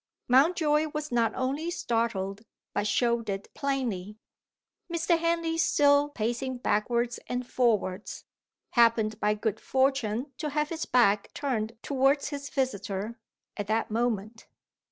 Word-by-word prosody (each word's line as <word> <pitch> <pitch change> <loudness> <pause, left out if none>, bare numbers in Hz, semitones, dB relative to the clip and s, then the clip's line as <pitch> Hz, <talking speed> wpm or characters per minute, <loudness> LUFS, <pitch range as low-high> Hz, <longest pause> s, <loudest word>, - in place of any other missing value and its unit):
Mountjoy 300 +3 +4
was 300 -1 -3
not 230 -2 +2
only 275 +6 -1
startled, 225 - -1 0.3
but 205 +1 0
showed 235 0 +1
it 195 0 -5
plainly. 230 -8 -2 0.7
Mr. 335 0 +2
Henley, 335 -1 0
still 285 -2 +4
pacing 240 +1 -2
backwards 235 +1 0
and 250 0 -2
forwards, 215 -7 0 0.5
happened 225 -3 +3
by 210 0 +2
good 215 -1 -2
fortune 265 -1 0
to 305 -1 -2
have 300 +1 0
his 325 -1 -4
back 210 -5 +3
turned 230 -5 -2
towards 275 +1 +2
his 285 -1 -5
visitor, 215 -3 -2 0.4
at 205 -1 -4
that 220 +1 0
moment. 225 -1 -2
240 Hz, 125 wpm, -28 LUFS, 215-285 Hz, 0.7 s, Mountjoy